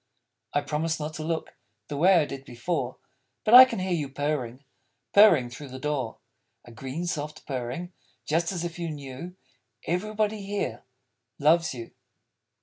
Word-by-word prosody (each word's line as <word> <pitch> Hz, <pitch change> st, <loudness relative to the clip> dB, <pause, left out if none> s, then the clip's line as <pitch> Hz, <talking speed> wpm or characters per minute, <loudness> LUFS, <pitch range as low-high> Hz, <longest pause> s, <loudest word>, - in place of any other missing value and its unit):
_ -, -, -49 dB, 0.5 s
I 145 Hz, -, +1 dB
promised 160 Hz, +2 st, -1 dB
not 150 Hz, +1 st, -4 dB
to 155 Hz, +1 st, -5 dB
look 160 Hz, 0 st, -3 dB, 0.3 s
(The 145 Hz, -, -5 dB
way 180 Hz, +6 st, +5 dB
I 165 Hz, -4 st, +4 dB
did 135 Hz, -1 st, -7 dB
before), 130 Hz, +1 st, -3 dB, 0.5 s
But 215 Hz, -, +3 dB
I 255 Hz, +1 st, +13 dB
can 255 Hz, -, -5 dB
hear 185 Hz, -1 st, -1 dB
you 150 Hz, -5 st, -1 dB
purring 140 Hz, -2 st, -3 dB, 0.5 s
Purring, 170 Hz, -, +6 dB
through 145 Hz, +4 st, -8 dB
the 130 Hz, 0 st, -8 dB
door: 135 Hz, -4 st, -2 dB, 0.5 s
A 120 Hz, -, -12 dB
green, 135 Hz, +9 st, -5 dB
soft, 150 Hz, -3 st, -4 dB
purring; 135 Hz, +7 st, -4 dB, 0.3 s
Just 165 Hz, +3 st, +1 dB
as 175 Hz, -3 st, -3 dB
if 170 Hz, 0 st, -6 dB
you 170 Hz, -1 st, -2 dB
knew: 145 Hz, +4 st, -7 dB, 0.5 s
_Everybody 210 Hz, +4 st, -1 dB
here 195 Hz, -, -3 dB, 0.5 s
Loves 160 Hz, 0 st, +3 dB
you. 115 Hz, -2 st, -8 dB
155 Hz, 160 wpm, -27 LUFS, 135-175 Hz, 0.5 s, I